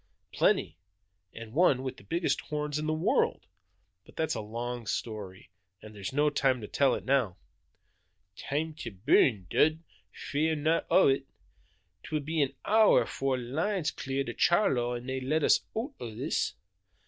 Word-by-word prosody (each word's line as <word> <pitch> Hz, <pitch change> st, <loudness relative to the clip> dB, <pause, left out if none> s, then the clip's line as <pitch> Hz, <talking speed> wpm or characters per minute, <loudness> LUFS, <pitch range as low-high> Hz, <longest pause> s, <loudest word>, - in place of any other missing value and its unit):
"Plenty, 80 Hz, -, +1 dB, 0.5 s
and 115 Hz, -1 st, -10 dB
one 140 Hz, -5 st, +3 dB
with 130 Hz, -, -5 dB
the -, -, -15 dB
biggest 170 Hz, -, -1 dB
horns 150 Hz, -1 st, -3 dB
in 155 Hz, -, -3 dB
the -, -, +1 dB
world! 155 Hz, +1 st, +1 dB, 0.6 s
But -, -, -19 dB
that's 160 Hz, -1 st, 0 dB
a -, -, -3 dB
long 120 Hz, +2 st, -5 dB
story, 100 Hz, -6 st, -5 dB, 0.3 s
and 110 Hz, +2 st, -12 dB
there's 100 Hz, -2 st, -5 dB
no 145 Hz, +2 st, +2 dB
time 135 Hz, -3 st, +2 dB
to 105 Hz, -, -6 dB
tell 135 Hz, +2 st, +2 dB
it -, -, -7 dB
now." 125 Hz, -9 st, +1 dB, 1.0 s
"Time 155 Hz, +3 st, -3 dB
to 115 Hz, -, -5 dB
burrn, 105 Hz, 0 st, +2 dB
Dud, 155 Hz, -, +4 dB
nae 160 Hz, -, -16 dB, 0.3 s
fear 155 Hz, +2 st, 0 dB
o' 190 Hz, -, +6 dB
it! 135 Hz, 0 st, +1 dB, 0.7 s
'Twill 155 Hz, -1 st, -3 dB
be 155 Hz, +2 st, -1 dB
an 140 Hz, -1 st, 0 dB
hour 220 Hz, 0 st, +5 dB
afore 135 Hz, -1 st, -2 dB
the 125 Hz, -, -5 dB
line's 160 Hz, -, -1 dB
clear 135 Hz, 0 st, -3 dB
to -, -, -5 dB
Charlo 130 Hz, -, +2 dB
an' 120 Hz, 0 st, -7 dB
they 130 Hz, 0 st, -3 dB
lat 150 Hz, +4 st, 0 dB
us -, -, +5 dB, 0.2 s
oot 255 Hz, +6 st, -3 dB
o' 115 Hz, -3 st, -7 dB
this. -, -, -1 dB
135 Hz, 170 wpm, -29 LUFS, 120-155 Hz, 1.0 s, o